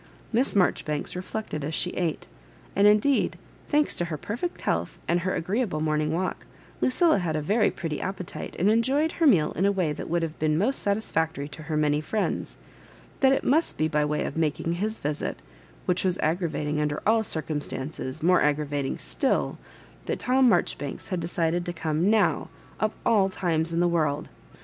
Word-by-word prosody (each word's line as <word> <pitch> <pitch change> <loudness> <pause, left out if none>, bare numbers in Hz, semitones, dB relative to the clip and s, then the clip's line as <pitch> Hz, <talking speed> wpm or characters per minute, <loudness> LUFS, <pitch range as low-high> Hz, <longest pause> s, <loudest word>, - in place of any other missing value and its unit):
Miss 245 +1 +2
Marjoribanks 155 -6 +1
reflected 185 -4 -4
as 155 +2 -2
she 180 - -1
ate— 170 -4 -2 0.5
and 200 +1 +5
indeed, 215 +7 +3 0.3
thanks 295 0 +2
to 175 - 0
her 165 -3 -4
perfect 240 - -4
healtii - - -1
and 170 +1 +2
her 185 +2 -1
agreeable 190 -2 -1
morning 155 0 0
walk, 180 +3 -2 0.3
Lucilla 315 - +3
had 165 -4 -1
a - - +1
very 205 +8 +2
pretty 160 -3 -4
appetite, 185 -2 -5
and 185 - +2
enjoyed 270 +8 +2
her 330 -2 +2
meal 165 - +4
in 180 - -1
a 200 - +4
way 180 -6 0
that - - -7
would 170 0 +1
have 160 -1 -4
been 155 0 +2
most 245 +10 +1
satis&ctory 160 -8 -1
to 150 - -9
her 155 0 -2
many 150 0 +2
friends 210 +7 -2 0.3
— - - -25
that 265 -1 +5
it 270 - +2
must 315 +5 +2
be 155 - +2
by 150 -1 +1
way 150 0 0
of - - -4
making 165 +1 0
his 215 +5 -2
visit, 150 +1 -3 0.5
which 180 0 +1
was 185 -1 +1
aggravatmg 155 -2 0
under 150 0 -1
all 225 +1 +4
dr 160 -7 -2
cumstances, 145 -2 -4
more 180 +2 +5
agravating 145 -2 0
still, - - 0 0.5
that - - -1
Tom 255 0 +3
Marjoribanks 170 -7 -1
had 185 - -1
decided 170 0 0
to 175 - -4
come 160 +3 0
now, 215 -1 +2 0.3
of 215 -1 +1
all 200 -4 +4
times 170 -3 0
in 165 - 0
the 175 - +4
world. 155 -4 0
175 Hz, 185 wpm, -26 LUFS, 155-210 Hz, 0.5 s, and